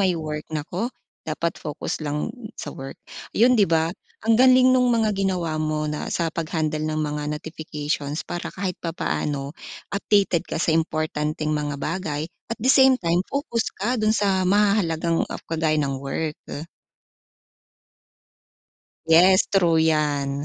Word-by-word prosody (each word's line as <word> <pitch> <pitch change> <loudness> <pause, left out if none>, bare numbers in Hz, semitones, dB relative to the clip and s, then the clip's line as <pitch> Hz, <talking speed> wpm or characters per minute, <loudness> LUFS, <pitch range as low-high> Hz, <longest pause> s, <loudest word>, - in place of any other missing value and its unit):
may 185 -3 +2
work. 155 -1 -5
Naku, 170 +9 -3 0.4
dapat 165 +2 -2
focus 150 +1 -4
lang 150 -1 -2 0.2
sa - - -6
work, 135 0 -8 0.4
'yon 240 +3 +6
'di 210 -7 +4
ba? 165 +1 +2 0.3
Ang 225 0 +4
galing 255 0 +7
no'ng 250 -1 +4
mga 225 -3 +2
ginawa 180 -5 -1
mo 155 0 -1
na 150 0 -3
sa 165 -2 -1
pag-handle 155 -2 -2
ng 155 0 -1
mga 150 0 -3
notifications 150 -2 -4
para 175 - -4
kahit 185 -2 -4
papaano, 145 -4 -2 0.4
updated 200 -4 +2
ka - - -3
sa 160 0 +1
importanteng 155 -1 -1
mga 145 -1 -2
bagay, 155 -1 -3 0.2
at 230 - -3
the 255 +5 +3
same 265 -1 +6
time, 170 -5 +1
focus 275 -5 -1
ka 235 +5 -1
do'n 215 0 +3
sa 190 -2 +2
mahahalagang 185 -5 +2
af - - -7
kagaya 160 -1 0
ng 140 -3 -1
work. 150 +3 -3 2.7
Yes, 185 +4 +6
true 170 -5 +3
'yan. 145 -3 +1
165 Hz, 140 wpm, -23 LUFS, 150-195 Hz, 2.7 s, galing